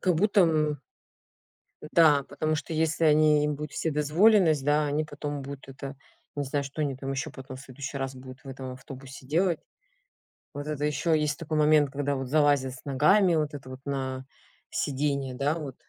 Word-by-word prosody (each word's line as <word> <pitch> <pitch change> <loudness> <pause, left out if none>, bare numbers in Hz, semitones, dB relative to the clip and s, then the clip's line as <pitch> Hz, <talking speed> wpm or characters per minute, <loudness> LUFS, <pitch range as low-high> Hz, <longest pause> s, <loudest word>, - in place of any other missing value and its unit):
как 185 -2 +2
будто 200 +4 +3
м 155 -4 +2 1.0
да, 150 -3 +4
потому 155 +2 -2
что 165 - -5
если 160 +1 +1
они 150 -1 +5
им 150 - 0
будут 150 0 -6
вседозволенность, 160 +1 +3
да, 150 +1 +2
они 150 +2 0
потом 145 -1 -5
будут 135 0 -9
это, 135 0 -8 0.4
не 145 - -1
знаю, 140 +1 -2
что 140 +3 -4
они 140 -3 -2
там 135 0 -5
еще 135 - -3
потом 130 -1 -9
в - - -11
следующий 140 +1 -7
раз 135 0 -3
будут 130 0 -11
в - - -10
этом 130 -1 -6
автобусе 135 +1 -11
делать. 170 +3 +1 0.9
Вот 145 +1 -6
это 150 -1 -2
еще 150 +2 +1
есть 150 -1 -1
такой 155 -2 -3
момент, 150 -2 +4
когда 145 0 -1
вот 135 -1 -4
залазят 145 -2 +2
с 130 - -13
ногами, 165 +7 +4
вот 150 -1 0
это 135 -2 -8
вот 130 - -8
на 130 -1 -3 0.5
сидение, 140 -2 -1
да 145 +4 0
вот. 145 -6 -6
145 Hz, 185 wpm, -27 LUFS, 135-155 Hz, 1.0 s, они